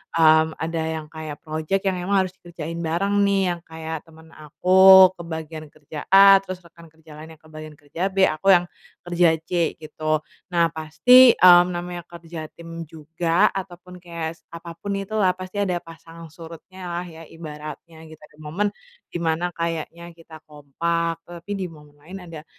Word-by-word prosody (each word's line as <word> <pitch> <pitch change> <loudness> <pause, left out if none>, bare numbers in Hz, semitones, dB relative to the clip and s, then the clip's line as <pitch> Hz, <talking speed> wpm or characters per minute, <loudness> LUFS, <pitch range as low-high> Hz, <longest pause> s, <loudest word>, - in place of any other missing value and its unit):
mmm, 160 -1 +4
ada 165 +1 -4 0.2
yang 155 -1 -6
kayak 155 -2 -8
project 160 +4 -2
yang 190 -2 -1
emang 195 -1 +3
harus 185 - -6
dikerjain 170 -1 -7
bareng 175 +5 -1
nih, 200 -1 +2
yang 175 - -5
kayak 160 0 -6
temen 160 0 -18
aku 185 +5 +6
ke 180 - -12
bagian 160 -1 -7
kerja 150 0 -10
A, 195 0 +8
terus 185 -2 -9
rekan 170 0 -17
kerja 160 0 -20
lainnya 160 +1 -11
kebagian 155 -1 -12
kerja 145 +2 -14
B, 195 0 +1
aku 155 +2 0
yang 175 - +2 0.4
kerja 175 -1 +2
C 170 -1 -1
gitu. 155 0 -3 0.3
Nah 170 -1 +2
pasti, 240 +11 +5
mmm, 175 -1 +7
namanya 175 0 -6
kerja 165 -2 -9
tim 165 -1 -9
juga, 165 +5 0
ataupun 180 -1 -8
kayak 165 -2 -6 0.2
apapun 170 +4 -6
itulah 195 -1 0
pasti 185 +2 -7
ada 190 -3 0
pasang 165 0 -13
surutnya 165 +3 -13
lah 175 0 -4
ya, 165 0 -12
ibaratnya 160 +1 -10
gitu. 160 0 -15
Ada 150 0 -18
momen, 165 +7 -2 0.4
di - - -4
mana 165 +1 -1
kayaknya 170 0 -5
kita 165 -1 -14
kompak, 165 +3 -3
tapi 175 +3 -10
di 190 - -3
momen 150 -3 -17
lain 175 +6 -10
ada, 165 -3 -11
165 Hz, 165 wpm, -22 LUFS, 160-180 Hz, 0.4 s, A